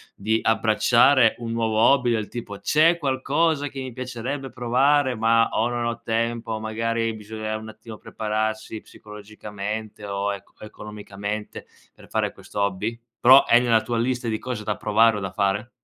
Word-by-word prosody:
di 110 +3 0
abbracciare 115 +2 +4
un 115 -1 -5
nuovo 115 -1 -1
hobby? 125 +1 +4
Del 110 -2 -1
tipo: 100 -4 -7
"C'è 160 +10 +3
qualcosa 145 +2 0
che 135 -1 -7
mi 130 -1 -6
piacerebbe 130 +2 -5
provare, 130 +2 +2
ma 115 +1 +3
o 115 +2 0
non 120 -1 -2
ho 115 0 -3
tempo", 115 0 -2
o 110 - -2
magari 115 +1 -2
bisogna 110 0 -5
un 110 0 -9
attimo 110 0 -11
prepararsi 110 0 -3
psicologicamente 105 0 -8
o 100 0 -2
eco 100 -1 -9
economicamente 105 0 -7 0.3
per - - -17
fare - - -1
questo 100 - -6
hobby? 100 +4 -1 0.2
Però 130 +3 +8
è 120 - +6
nella 115 -3 +3
tua 120 0 -3
lista 125 +1 -1
di 110 -1 -1
cose 120 -3 -5
da 105 0 -2
provare 110 +1 +3
o - - -3
da 95 -2 -5
fare? 100 +4 -1
115 Hz, 165 wpm, -23 LUFS, 105-120 Hz, 0.3 s, Però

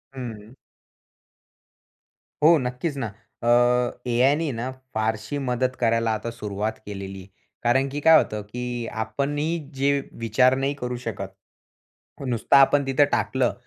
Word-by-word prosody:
हम्म. 115 -3 -7 1.9
हो, 160 +2 +7
नक्कीच 135 +5 -3
ना, 115 -4 -2 0.4
अ, 120 +1 +3
एआय 130 +4 +4
ने 160 -2 -1
ना, 130 +2 -3 0.2
फारशी 110 +4 -1
मदत 125 +1 0
करायला 115 -1 +2
आता 110 +2 -3
सुरुवात 105 -1 -4
केलेलीय. 95 -2 -7 0.4
कारण 135 +3 +3
की 145 +2 -4
काय 160 +1 +8
होतं, 105 -7 0
की 120 +2 -5 0.2
आपण 140 +6 -2
ही 165 +3 0 0.2
जे 140 +1 +2 0.3
विचार 125 +4 +4
नाही 135 +1 0
करू 125 0 -2
शकत. 95 -3 -5 0.9
नुसतं 120 +2 +2
आपण 140 +1 +5
तिथं 135 +2 +4
टाकलं 130 -2 +1
125 Hz, 130 wpm, -24 LUFS, 110-135 Hz, 1.9 s, काय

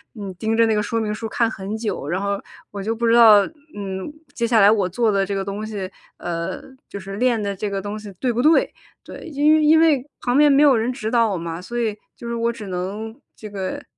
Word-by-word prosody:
嗯， 200 -3 -6
盯 220 +4 -1
着 230 - +5
那 220 - +1
个 210 - 0
说 230 +2 -2
明 215 -1 -2
书 225 0 -5
看 230 0 +1
很 200 0 -5
久 205 -10 -4
然 185 +3 -1
后， 200 0 -2 0.3
我 200 -1 -6
就 220 +3 -1
不 230 +1 -1
知 230 - +4
道， 220 -4 +7 0.3
嗯， 195 +3 -5 0.2
接 235 - -1
下 230 -1 +3
来 200 - +7
我 205 -4 +2
做 225 +4 +1
的 195 0 +1
这 200 - -4
个 195 -1 -2
东 205 +2 -4
西， 200 -4 -5 0.3
呃， 170 -1 -4 0.3
就 200 - -7
是 195 +1 -8
练 240 -1 +1
的 200 -1 -3
这 205 +2 -3
个 195 -1 -3
东 205 +1 -5
西 210 -1 -9
对 250 -2 0
不 235 - 0
对， 310 +4 +3 0.3
对。 - - -10
因 305 +1 +3
因 315 +1 +6
为 305 -6 +3 0.2
旁 245 +2 +1
边 295 0 +6
没 280 +1 +5
有 280 -3 +6
人 230 +2 0
指 225 -4 -4
导 230 -2 +3
我 185 - -2
嘛， 165 0 -5
所 240 +6 -6
以 220 -3 -1 0.2
就 235 - -9
是 235 - -3
我 230 0 0
只 220 -3 -9
能 195 +5 -5 0.2
这 215 - -9
个 195 -2 -5
215 Hz, 270 characters per minute, -21 LUFS, 195-235 Hz, 0.3 s, 道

